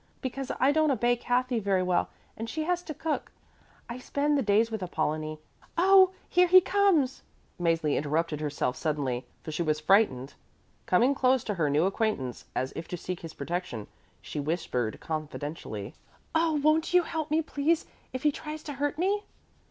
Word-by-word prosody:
Because 270 Hz, 0 st, -4 dB
I 265 Hz, +2 st, +5 dB
don't 310 Hz, +1 st, +3 dB
obey 245 Hz, -2 st, +2 dB
Kathy 245 Hz, 0 st, 0 dB
very 195 Hz, -3 st, +1 dB
well 180 Hz, -1 st, +1 dB, 0.3 s
and 225 Hz, +1 st, -5 dB
she 315 Hz, +5 st, -2 dB
has 355 Hz, +2 st, 0 dB
to 320 Hz, -, -6 dB
cook, 320 Hz, +1 st, -3 dB, 0.6 s
I 235 Hz, +1 st, -6 dB
spend 285 Hz, +3 st, 0 dB
the 280 Hz, -, +2 dB
days 220 Hz, +1 st, +3 dB
with 220 Hz, -2 st, -3 dB
Apollonie. 155 Hz, -3 st, -2 dB, 0.4 s
Oh, 380 Hz, +1 st, +7 dB, 0.2 s
here 360 Hz, 0 st, +4 dB
he 370 Hz, +1 st, +9 dB
comes!" 370 Hz, -8 st, +2 dB, 0.4 s
Mäzli 165 Hz, -3 st, +2 dB
interrupted 155 Hz, +1 st, -1 dB
herself 145 Hz, -4 st, -1 dB
suddenly, 140 Hz, -6 st, -2 dB, 0.2 s
for 155 Hz, -, -5 dB
she 155 Hz, -, -2 dB
was 155 Hz, -2 st, +1 dB
frightened. 155 Hz, -, +3 dB, 0.5 s
Coming 240 Hz, +9 st, +4 dB
close 260 Hz, -2 st, +2 dB
to 210 Hz, -, -2 dB
her 165 Hz, -6 st, 0 dB
new 150 Hz, +4 st, +3 dB
acquaintance, 195 Hz, -, -1 dB
as 130 Hz, +1 st, -2 dB
if 165 Hz, -, -6 dB
to 180 Hz, -, -4 dB
seek 180 Hz, +1 st, -5 dB
his 165 Hz, -1 st, -9 dB
protection, 145 Hz, -, -4 dB, 0.4 s
she -, -, -5 dB
whispered 140 Hz, -7 st, -2 dB
confidentially. 150 Hz, -8 st, -5 dB, 0.4 s
"Oh, 325 Hz, 0 st, +2 dB
won't 320 Hz, +3 st, +3 dB
you 360 Hz, -, +6 dB
help 320 Hz, -2 st, -3 dB
me, 315 Hz, +2 st, +2 dB
please, 310 Hz, +2 st, 0 dB, 0.3 s
if 255 Hz, 0 st, -5 dB
he 300 Hz, -, +4 dB
tries 305 Hz, +1 st, -7 dB
to 290 Hz, -, -5 dB
hurt 290 Hz, +1 st, -2 dB
me?" 400 Hz, +4 st, +1 dB
225 Hz, 175 wpm, -28 LUFS, -, 0.6 s, he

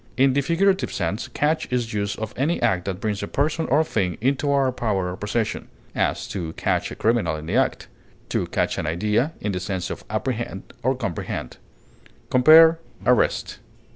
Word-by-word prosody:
In 135 Hz, 0 st, +4 dB
the 140 Hz, -, +2 dB
figurative 185 Hz, +6 st, +1 dB
sense, 95 Hz, +4 st, -2 dB
catch 155 Hz, -1 st, -1 dB
is 120 Hz, -2 st, -1 dB
used 100 Hz, -1 st, -2 dB
of 110 Hz, -1 st, -5 dB
any 150 Hz, +7 st, 0 dB
act 90 Hz, -2 st, +1 dB
that 95 Hz, -2 st, -3 dB
brings 105 Hz, -1 st, -2 dB
a -, -, -3 dB
person 155 Hz, +3 st, 0 dB
or 150 Hz, +4 st, +4 dB
thing 95 Hz, -, -1 dB
into 135 Hz, +4 st, +1 dB
our 135 Hz, -2 st, +3 dB
power 100 Hz, -7 st, -1 dB
or -, -, -5 dB
possession; 105 Hz, +3 st, -2 dB, 0.3 s
as, -, -, -1 dB
to 85 Hz, -5 st, -4 dB
catch -, -, -1 dB
a -, -, -7 dB
criminal 110 Hz, -7 st, +1 dB
in 75 Hz, 0 st, -7 dB
the 90 Hz, +7 st, -2 dB
act; 130 Hz, +1 st, +1 dB, 0.4 s
to -, -, -1 dB
catch -, -, -1 dB
an -, -, -3 dB
idea, 105 Hz, -, 0 dB
in 105 Hz, -, -1 dB
the 90 Hz, -, -2 dB
sense 90 Hz, -1 st, -3 dB
of -, -, -6 dB
apprehend 110 Hz, -2 st, -3 dB, 0.2 s
or 130 Hz, +2 st, +1 dB
comprehend. 100 Hz, -, -4 dB, 0.7 s
Compare 160 Hz, +5 st, +7 dB, 0.3 s
ARREST. 125 Hz, -1 st, +2 dB
115 Hz, 180 wpm, -23 LUFS, 95-140 Hz, 0.7 s, Compare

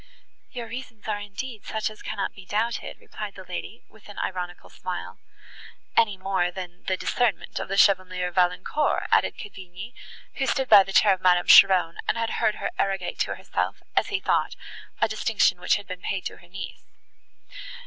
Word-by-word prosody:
"Your 240 Hz, -2 st, -6 dB
reasons 230 Hz, -2 st, -8 dB
are 210 Hz, -1 st, -1 dB
indeed 205 Hz, +3 st, -7 dB
such 220 Hz, 0 st, -2 dB
as 215 Hz, -, -14 dB
cannot 200 Hz, -3 st, -3 dB
be 195 Hz, -, -12 dB
doubted," 215 Hz, +5 st, -2 dB
replied 210 Hz, -2 st, -7 dB
the 190 Hz, -, -9 dB
lady, 185 Hz, +5 st, -7 dB
with 220 Hz, -1 st, -18 dB
an 205 Hz, -, -11 dB
ironical 180 Hz, -1 st, -4 dB
smile. -, -, -6 dB, 0.8 s
"Any 210 Hz, -4 st, +3 dB
more 185 Hz, -2 st, 0 dB
than 180 Hz, 0 st, -8 dB
the 185 Hz, -, 0 dB
discernment 240 Hz, 0 st, 0 dB
of -, -, -4 dB
the 195 Hz, -, -2 dB
Chevalier 185 Hz, -2 st, +3 dB
Valancourt," 180 Hz, -, +1 dB
added -, -, +3 dB
Cavigni, 190 Hz, +2 st, -9 dB, 0.4 s
who 270 Hz, -, -1 dB
stood 265 Hz, -1 st, +1 dB
by 210 Hz, -2 st, +10 dB
the 195 Hz, -, -7 dB
chair 200 Hz, 0 st, +6 dB
of 185 Hz, -, -5 dB
Madame 180 Hz, -1 st, +4 dB
Cheron, 180 Hz, -4 st, +7 dB
and -, -, +1 dB
had 230 Hz, 0 st, -1 dB
heard 215 Hz, -, +3 dB
her -, -, -3 dB
arrogate 195 Hz, -2 st, -1 dB
to -, -, 0 dB
herself, -, -, -3 dB
as -, -, +3 dB
he 405 Hz, -2 st, -1 dB
thought, -, -, +1 dB, 0.4 s
a -, -, +3 dB
distinction -, -, +1 dB
which -, -, +3 dB
had 205 Hz, -, -5 dB
been 180 Hz, -1 st, -7 dB
paid 190 Hz, -1 st, -3 dB
to -, -, -5 dB
her 175 Hz, -, -18 dB
niece. 180 Hz, 0 st, -8 dB
195 Hz, 180 wpm, -25 LUFS, 185-220 Hz, 0.8 s, by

